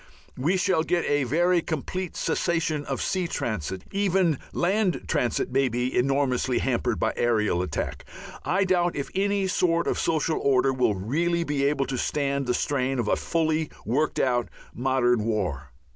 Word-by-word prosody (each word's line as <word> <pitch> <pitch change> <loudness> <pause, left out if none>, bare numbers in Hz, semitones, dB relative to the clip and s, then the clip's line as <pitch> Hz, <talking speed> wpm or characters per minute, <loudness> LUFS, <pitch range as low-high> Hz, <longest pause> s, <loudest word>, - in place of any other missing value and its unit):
We 165 +9 +1
shall 180 -2 +2
get 175 +1 0
a 145 -2 +1
very 175 +6 +2
complete 170 +3 -4
cessation 165 -4 0
of 135 - -2
sea 185 -2 -1
transit. 95 - -3
Even 190 -6 +2
land 190 +1 +1
transit 125 -7 0
may 135 0 +2
be 125 +2 -2
enormously 130 -1 +1
hampered 120 -2 0
by 110 - +1
aerial 105 -6 +1
attack. 90 -5 -3 0.4
I 195 +2 +1
doubt 175 -2 +1
if 140 - -3
any 200 0 +1
sort 170 -2 +1
of - - -1
social 160 0 0
order 135 -1 +3
will 125 -5 +1
really 165 - 0
be 145 -3 0
able 140 -1 +1
to 130 -2 -3
stand 140 -1 -1
the 125 - +1
strain 135 -2 0
of 120 - -1
a - - +3
fully 160 -2 0 0.2
worked 145 +8 0
out 120 -2 +1 0.2
modern 125 -2 +1
war. 90 - -2
140 Hz, 160 wpm, -26 LUFS, 125-170 Hz, 0.4 s, order